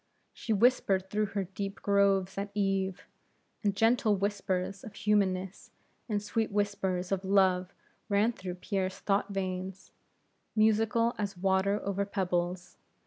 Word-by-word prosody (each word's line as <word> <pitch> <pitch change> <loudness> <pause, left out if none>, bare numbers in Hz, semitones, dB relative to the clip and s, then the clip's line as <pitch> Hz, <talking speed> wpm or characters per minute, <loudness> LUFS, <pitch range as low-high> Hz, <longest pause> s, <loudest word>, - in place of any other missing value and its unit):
She 225 - -5
whispered 200 -4 +3
through 210 0 +1
her 195 - +1
deep 195 +2 -6
groves 195 -2 +3
at 200 +1 -3
eve, 195 -2 0 0.6
and 200 -2 +1
gentle 225 0 +3
whispers 195 -1 -2
of 215 - -10
humanness, 195 -2 0 0.4
and 205 -1 -1
sweet 220 +1 -1
whispers 195 -3 -1
of 195 -1 0
love, 190 -1 +3 0.4
ran 205 +3 +3
through 185 -6 -6
Pierre's 190 0 -2
thought 200 0 0
veins, 185 -1 -4 0.6
musical 225 +2 +3
as 200 -2 -3
water 190 +2 +2
over 200 0 -1
pebbles. 180 -2 -2
195 Hz, 130 wpm, -30 LUFS, 190-210 Hz, 0.6 s, whispered